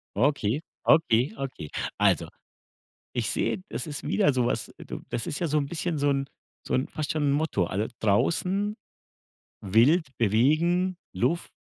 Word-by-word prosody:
Okay, 130 +1 +1 0.2
okay, 140 -5 +4
okay. 125 - -5 0.3
Also, - - +3 0.9
ich - - -1
sehe, 185 - -1
das - - -4
ist 145 -1 -5
wieder 190 -10 +2
so 125 -2 +1
was. - - -1
Du - - -6
das 120 -1 -3
ist 145 - -3
ja 170 - 0
so 155 +1 +1
'n 140 - +1
bisschen 170 0 -2
so 145 0 +2
'n 135 0 +1 0.4
so - - -3
'n 130 - +1
fast 155 -2 -3
schon 155 -2 -1
'n 140 - +3
Motto. 145 - +1
Alle 100 +5 -2
draußen, 185 - +1 0.9
wild, 120 - +4
bewegen, 155 - +2 0.2
Luft. 170 +1 0
145 Hz, 160 wpm, -27 LUFS, 120-165 Hz, 0.9 s, okay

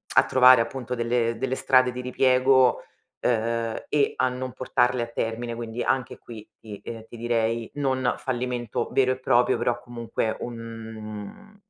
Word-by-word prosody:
a - - +7
trovare 130 -1 +7
appunto 125 +1 -4
delle 115 -1 0
delle 130 0 -1
strade 130 -2 +3
di 125 - -5
ripiego, 130 0 +3 0.4
ehm, 115 -1 -1
e 145 -2 +2
a 130 - +2
non 130 0 -5
portarle 125 -1 +1
a - - -5
termine. 115 +1 -3
Quindi 115 0 -5
anche 130 -2 -1
qui 110 -3 -11
ti, 105 -2 -10
uhm, 115 -1 -7
ti - - -12
direi 115 -1 -1
non 130 -3 0
fallimento 125 -3 -3
vero 130 -1 +3
e 130 - -10
proprio 125 -1 +3
però 120 0 0
comunque 115 -2 -3
un 115 - -8
120 Hz, 155 wpm, -25 LUFS, 115-130 Hz, 0.4 s, a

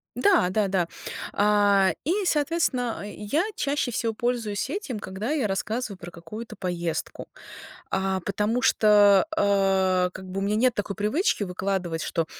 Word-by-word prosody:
Да, 370 - +3
да, 205 +1 +1
да, 185 -3 0 0.5
а, 205 -2 +3
и, 375 +7 0
соответственно, 290 - 0
я 210 +10 -1
чаще 280 -3 -1
всего 225 0 -1
пользуюсь 230 -3 -2
этим, 275 - -4
когда 195 +8 -4
я 280 -8 +1
рассказываю 210 +2 -3
про 175 -2 -8
какую-то 210 +8 -9
поездку. 170 -3 -4 0.6
А, 190 0 0
потому 210 +6 -1
что, 205 -4 +5
э, 190 -2 +2
как 190 0 -10
бы 195 - -3
у - - -3
меня 205 +1 0
нет 245 +1 +3
такой 200 -1 -3
привычки 215 - 0
выкладывать, 180 -3 -2
что 165 0 -1
205 Hz, 145 wpm, -25 LUFS, 190-240 Hz, 0.6 s, что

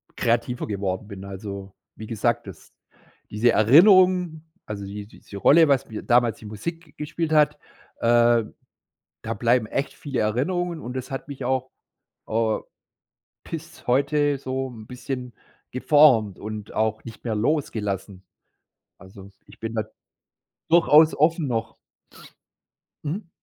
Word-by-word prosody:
kreativer 120 +1 0
geworden 100 0 -3
bin. 100 -2 -9
Also, 100 0 -7 0.2
wie 110 - -9
gesagt, 120 +1 -1
dass 95 -5 -12 0.6
diese 115 +3 +2
Erinnerung 180 - +5 0.2
also 100 -2 -6
die 100 +1 -7
diese 100 - -12
Rolle, 160 +10 +6
was 140 -3 +2
mir 110 - -6
damals 120 -2 +3
die - - -14
Musik 150 - -7
gespielt 155 +2 -3
hat, 150 -1 +4 0.4
äh, 120 0 +4 0.8
da - - -3
bleiben 120 +2 +2
echt 140 +6 -3
viele 140 -4 -4
Erinnerungen 170 +10 -1
und 125 +2 -7
das 130 +2 -5
hat 135 +2 -6
mich 140 -2 -7
auch, 130 +1 -1 0.6
äh, 110 -1 +1 0.9
bis 165 +1 -9
heute 145 +3 +2
so 130 0 -3
'n 110 -3 -11
bisschen 125 0 -6 0.4
geformt 130 -7 +4
und 105 0 -7
auch 110 0 -1
nicht 115 - -11
mehr 115 -2 -1
losgelassen. 105 - -2 0.8
Also, 95 0 -13 0.2
ich - - -17
bin 115 0 -5
da 110 - 0 0.9
durchaus 160 -2 +6
offen 160 +1 +2
noch. 115 -2 -3 1.3
Mhm. 170 +5 -4
120 Hz, 130 wpm, -24 LUFS, 110-150 Hz, 1.3 s, Rolle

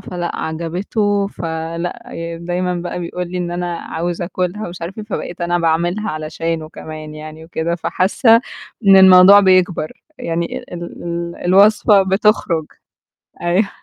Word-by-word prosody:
فلأ 175 -2 -5
عجبته، 195 +6 -1
فلأ 165 -1 -5
يعني 165 0 -6
دايمًا 180 +1 -2
بقى 175 +1 -4
بيقول 175 +1 -5
لي 180 - -3
إن: 175 -1 -3
"أنا 175 0 -3
عاوز 175 +2 -4
أكلها" 180 +3 -3
ومش 175 0 -9
عارف 185 +6 -6
إيه، 215 - -5
فبقيت 190 -4 -6
أنا 175 0 0
باعملها 175 +5 0
علشانه 155 +1 -4
كمان 155 -1 -9
يعني 155 +1 -10
وكده، 165 0 -2
فحاسّة 220 +7 +3 0.5
إن 195 -1 +8
الموضوع 190 +1 +8
بيكبر، 185 -4 +2 0.3
يعني 170 0 -3
ال - - -14
ال 175 - -6 0.2
ال 170 0 -4
الوصفة 200 +2 +5
بتخرج 190 -5 +1 0.8
أيوه 180 +4 +1
175 Hz, 145 wpm, -18 LUFS, 165-190 Hz, 0.8 s, إن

